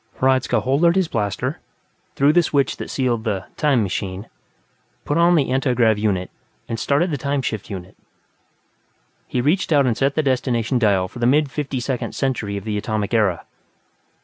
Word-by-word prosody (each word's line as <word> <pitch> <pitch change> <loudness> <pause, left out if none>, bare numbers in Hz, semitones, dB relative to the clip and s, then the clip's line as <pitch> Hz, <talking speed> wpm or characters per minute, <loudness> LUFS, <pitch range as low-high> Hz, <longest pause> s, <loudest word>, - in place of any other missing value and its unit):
Hradzka 130 -1 +2
holstered 155 +7 +2
his 190 -3 +2
blaster, 105 -8 -2 0.6
threw 140 +2 +4
the 175 - +5
switch 145 -4 0
that - - -6
sealed 120 -4 -1
the 105 -4 -2
"time 140 -7 +2
machine", 95 +1 -4 0.8
put 145 - -1
on 170 +1 +4
the 140 -5 +1
antigrav 125 -5 +2
unit 95 -4 -1 0.4
and 115 - -4
started 150 +8 +1
the 145 - -2
time 140 +1 -1
shift 110 -5 -4
unit. 95 -2 -8 1.3
He 125 - -1
reached 165 +7 +1
out 145 -3 +4
and 120 -3 +1
set 135 +3 0
the 155 - +1
destination 125 -2 0
dial 100 -5 +2
for 120 - -11
the 120 - +2
mid 145 +1 +3
Fifty 140 -3 -3
Second 125 0 -3
Century 115 -7 -2
of 100 - -6
the 105 -1 -2
Atomic 105 0 -3
Era. 105 -6 +1
125 Hz, 175 wpm, -21 LUFS, 110-140 Hz, 1.3 s, the